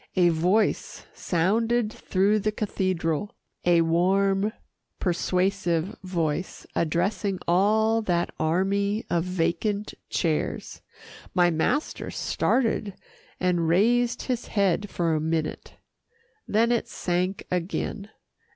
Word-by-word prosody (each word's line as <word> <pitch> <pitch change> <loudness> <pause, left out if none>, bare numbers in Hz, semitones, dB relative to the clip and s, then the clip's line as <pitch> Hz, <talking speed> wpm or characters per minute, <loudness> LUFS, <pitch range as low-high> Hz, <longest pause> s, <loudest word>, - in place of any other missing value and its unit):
A 180 -2 +5
voice 180 +7 +1
sounded 220 +6 +1
through 200 +3 +1
the 215 +1 0
cathedral 185 -4 -2 0.3
a 175 -1 +5
warm, 195 +5 +2 0.5
persuasive 180 0 0
voice, 175 -2 -2
addressing 190 +4 0
all 215 +5 +3
that 175 -5 0
army 200 +6 +1
of 170 -1 +2
vacant 185 +4 -1 0.2
chairs. 160 -4 -2 0.5
My 175 -1 +4
master 165 - -1
started, 225 -5 0 0.4
and 175 -3 +1
raised 235 +7 +2
his 250 -2 -2
head 200 0 +1
for 170 -2 0
a 155 - 0
minute. 160 0 -2 0.7
Then 230 +3 +2
it 240 - +1
sank 180 +2 -2
again. 180 +3 -2
185 Hz, 100 wpm, -26 LUFS, 170-210 Hz, 0.7 s, A